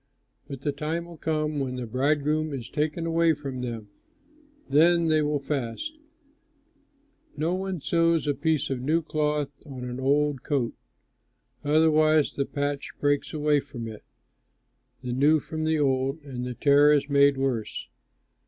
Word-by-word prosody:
But 135 -3 -7
the 145 - 0
time 160 +4 -3
will 170 -2 -12
come 155 -1 -1
when 130 -2 -2
the 125 -1 -4
bridegroom 150 +5 0
is 125 -4 -6
taken 155 +2 -1
away 165 -1 +3
from 135 -3 -6
them; 115 -4 -5 0.8
then 165 +4 +4
they 155 0 +3
will 150 0 +1
fast. 140 - -4 1.4
No 160 +4 0
one 190 -3 -3
sews 165 +1 +2
a 145 - +1
piece 155 +1 0
of 130 -2 -2
new 160 +5 +1
cloth 150 -2 -1
on 135 -4 -8
an 125 0 -5
old 145 0 +1
coat; 135 -6 -1 0.9
otherwise 155 0 +3
the 140 - -2
patch 145 0 -3
breaks 145 0 +1
away 150 -1 +2
from 130 -5 -7
it, 110 -1 -9 1.0
the 125 -1 -3
new 145 +5 +4
from 155 +2 -4
the 160 0 +2
old, 135 0 +1
and 125 -3 -5
the 125 - -5
tear 145 +3 +5
is 145 -1 +2
made 140 -1 +4
worse. 130 -5 -2
145 Hz, 155 wpm, -26 LUFS, 135-155 Hz, 1.4 s, tear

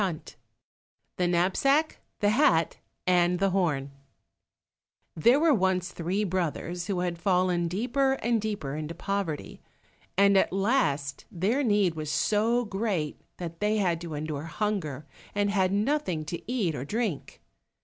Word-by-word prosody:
54 180 -6 -3 0.8
The 180 - +1
Knapsack, 195 - +2 0.2
the 205 0 +4
Hat, 175 - +3 0.3
and 180 -1 +3
the 195 +1 +1
Horn 150 -8 0 1.2
There 235 - +4
were 320 -1 +4
once 185 -4 +1
three 180 +5 -1
brothers 175 -1 -2
who 190 -4 -1
had 175 -2 -2
fallen 180 -1 +2
deeper 250 +9 +1
and 235 -3 0
deeper 200 -10 -3
into 155 +2 -5
poverty, 190 -4 -3 0.6
and 200 0 +5
at - - +1
last 190 - 0
their 210 +11 0
need 205 -7 +2
was 155 -2 -5
so 225 +7 +2
great 195 -7 -2 0.2
that 170 -2 -6
they 210 +1 +1
had 175 -5 +1
to 165 -3 -5
endure 150 0 -4
hunger, 165 -5 -3 0.3
and 205 0 +1
had 190 -2 +2
nothing 205 - 0
to 170 +9 -6
eat 210 -10 0
or 140 - -4
drink. 210 - -3
185 Hz, 140 wpm, -28 LUFS, 165-210 Hz, 1.2 s, and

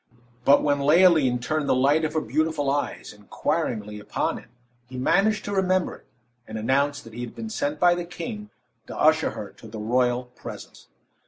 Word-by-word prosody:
But 140 - +6
when 145 -1 +2
Leoline 150 -3 +5
turned 150 +4 -2
the - - +4
light 140 +5 +3
of 155 - -1
her 155 - +2
beautiful 155 -3 0
eyes 145 +1 -3
inquiringly 105 - -3
upon 105 - -2
him, - - -18 0.4
he 130 +1 -9
managed 210 +11 +2
to 205 - -3
remember 185 -1 +1
it, - - -26 0.4
and 110 - -6
announced 140 +6 0
that 115 - -13
he 120 - -6
had 120 - -7
been 225 -1 -6
sent 285 +5 -2
by 175 -1 +5
the 175 0 -3
king 210 +4 -7 0.4
to - - -7
usher - - +4
her - - -7
to 115 - -14
the 110 +1 -8
royal 125 +3 +1
presence. 125 -1 -11
145 Hz, 185 wpm, -25 LUFS, 125-175 Hz, 0.4 s, But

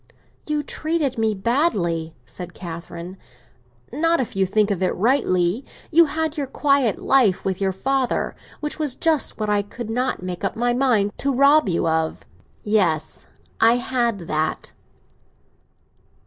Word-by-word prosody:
"You 300 -1 -1
treated 310 -4 -2
me 220 -1 +1
badly," 190 - 0
said 180 +6 -8
Catherine. 170 +1 -8 0.8
"Not 330 +4 +2
if 245 -7 -3
you 190 -1 +2
think 210 +1 +2
of 190 -2 -2
it 185 - +1
rightly. 190 -2 +1 0.3
You 335 +1 +6
had 320 0 -2
your 280 - -2
quiet 275 -5 +2
life 245 -9 +2
with 190 0 -2
your 190 -1 +1
father—which 270 +6 -3
was 295 -5 +2
just 315 -7 +1
what 215 - -1
I 205 -1 +2
could 220 +2 -7
not 250 -4 -1
make 180 0 -5
up 195 - -1
my 240 +1 +1
mind 240 -6 +2
to 280 - 0
rob 280 -2 +4
you 170 -1 0
of." 160 0 -1 0.4
"Yes; 180 -8 0 0.3
I 225 +1 +5
had 240 -4 -1
that." 155 -1 -2
225 Hz, 145 wpm, -22 LUFS, 185-275 Hz, 0.8 s, You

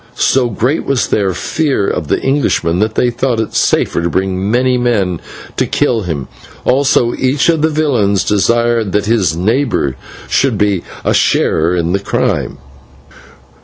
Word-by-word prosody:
So 130 -2 +2
great 125 +8 -1
was 135 -3 0
their 100 -3 +1
fear 135 - -1
of 80 - -2
the - - 0
Englishman, 130 - 0
that 110 +1 0
they 125 - +2
thought 120 -1 -1
it 110 - -3
safer - - +1
to 85 - -1
bring 95 +3 -1
many 125 +2 +2
men 105 -9 0 0.4
to - - +1
kill 115 -3 0
him, 80 -8 -4 0.4
also 130 -3 +2
each 135 +5 +1
of 165 -2 +2
the 160 - +3
villains 125 -11 +1
desired 115 0 +1
that 105 0 +1
his 100 -8 +1
neighbour 110 - 0 0.3
should 135 -6 +1
be 100 -3 +1 0.2
a - - +2
sharer 80 +3 +2
in 85 -1 -1
the 100 - +1
crime. 100 - -1
110 Hz, 160 wpm, -14 LUFS, 95-130 Hz, 0.4 s, the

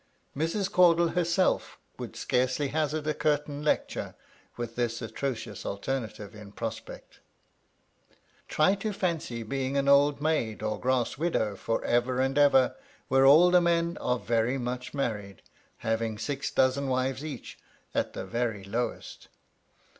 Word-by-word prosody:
Mrs. 165 +7 0
Caudle 170 -1 +5
herself 175 +2 +1 0.2
would - - -7
scarcely 130 +3 0
hazard 155 0 -1
a 155 - +1
curtain 150 -1 -1
lecture 150 - -1 0.4
with 120 -1 -5
this 120 -1 -1
atrocious 115 -3 -4
alternative 110 -1 -4
in 105 -1 -12
prospect. - - -7 1.3
Try 155 +5 +3
to 205 +1 -3
fancy 160 -11 -2
being 135 +4 -2
an 140 0 +1
old 140 +1 +5
maid 145 -9 -1
or 110 0 -2
grass 130 0 0
widow 110 -11 0
for 115 +3 -2
ever 125 +1 +1
and 135 +1 +1
ever 135 -3 +5 0.3
where 135 +1 +5
all 165 +6 +7
the 180 0 +6
men 170 0 +1
are 125 - +1
very 115 +2 0
much 125 0 -4
married, 105 -8 -3 0.3
having 110 -1 -2
six 135 +5 -3
dozen 130 +2 +2
wives 130 +1 -1
each 145 -6 -7 0.3
at - - -1
the - - -5
very 115 -1 -2
lowest! 115 +5 -4
135 Hz, 140 wpm, -28 LUFS, 115-155 Hz, 1.3 s, all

